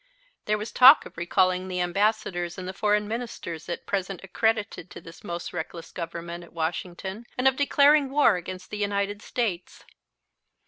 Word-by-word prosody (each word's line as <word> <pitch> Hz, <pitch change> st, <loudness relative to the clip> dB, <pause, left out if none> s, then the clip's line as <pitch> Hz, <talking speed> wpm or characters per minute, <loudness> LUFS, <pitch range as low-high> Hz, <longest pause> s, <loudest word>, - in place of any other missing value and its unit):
There 210 Hz, 0 st, +1 dB
was 210 Hz, +2 st, -6 dB
talk 265 Hz, +4 st, +8 dB
of -, -, -12 dB
recalling 185 Hz, +2 st, +1 dB
the 180 Hz, -1 st, -3 dB
ambassadors 180 Hz, -1 st, 0 dB
and 185 Hz, -1 st, -6 dB
the 185 Hz, -, -4 dB
foreign 210 Hz, +1 st, +1 dB
Ministers 220 Hz, -8 st, -5 dB
at 170 Hz, -, -4 dB
present 195 Hz, -1 st, -3 dB
accredited 220 Hz, -2 st, -1 dB
to -, -, -10 dB
this 165 Hz, 0 st, -14 dB
most 170 Hz, 0 st, -5 dB
reckless 165 Hz, 0 st, -6 dB
Government 170 Hz, +1 st, -6 dB
at 170 Hz, -, -16 dB
Washington 180 Hz, +6 st, -4 dB
and 255 Hz, +1 st, +3 dB
of 265 Hz, -, +4 dB
declaring 285 Hz, 0 st, +4 dB
war 275 Hz, -7 st, +4 dB
against 180 Hz, +1 st, -7 dB
the 210 Hz, -, -4 dB
United 205 Hz, 0 st, -1 dB
States. 205 Hz, -9 st, -3 dB
190 Hz, 165 wpm, -26 LUFS, 175-220 Hz, -, talk